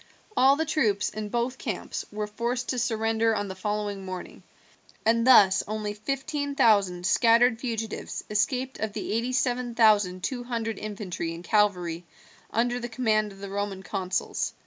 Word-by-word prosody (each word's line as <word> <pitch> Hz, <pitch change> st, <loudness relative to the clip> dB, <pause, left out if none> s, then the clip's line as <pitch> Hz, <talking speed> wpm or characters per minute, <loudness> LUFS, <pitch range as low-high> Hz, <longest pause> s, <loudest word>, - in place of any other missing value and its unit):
All 270 Hz, +2 st, +6 dB
the 320 Hz, +2 st, -1 dB
troops 215 Hz, -11 st, +1 dB
in 215 Hz, -1 st, -5 dB
both 240 Hz, +3 st, -2 dB
camps -, -, -4 dB
were 210 Hz, 0 st, -3 dB
forced 235 Hz, +4 st, -3 dB
to 255 Hz, -, 0 dB
surrender 225 Hz, -1 st, +1 dB
on 205 Hz, -1 st, -2 dB
the -, -, -4 dB
following 205 Hz, 0 st, -3 dB
morning, 185 Hz, -1 st, -7 dB, 0.6 s
and 230 Hz, +2 st, +3 dB
thus 200 Hz, -7 st, +7 dB
only 210 Hz, 0 st, -3 dB
fifteen 280 Hz, +6 st, -3 dB
thousand 200 Hz, -, +3 dB
scattered 230 Hz, +2 st, +4 dB
fugitives 225 Hz, -3 st, -4 dB
escaped 250 Hz, +5 st, -1 dB
of 220 Hz, -2 st, -3 dB
the -, -, -4 dB
eighty 235 Hz, +3 st, 0 dB
seven 250 Hz, -2 st, 0 dB
thousand 205 Hz, -5 st, +4 dB
two 245 Hz, -2 st, -2 dB
hundred 230 Hz, -2 st, -3 dB
infantry 195 Hz, -5 st, -4 dB
and 170 Hz, -, -10 dB
cavalry 180 Hz, -5 st, +1 dB, 0.5 s
under 240 Hz, +2 st, 0 dB
the 240 Hz, 0 st, -5 dB
command 215 Hz, -3 st, +1 dB
of 195 Hz, -, -13 dB
the 200 Hz, -, -6 dB
Roman 200 Hz, -1 st, -3 dB
consuls. 185 Hz, -1 st, -2 dB
220 Hz, 160 wpm, -27 LUFS, 205-245 Hz, 0.6 s, thus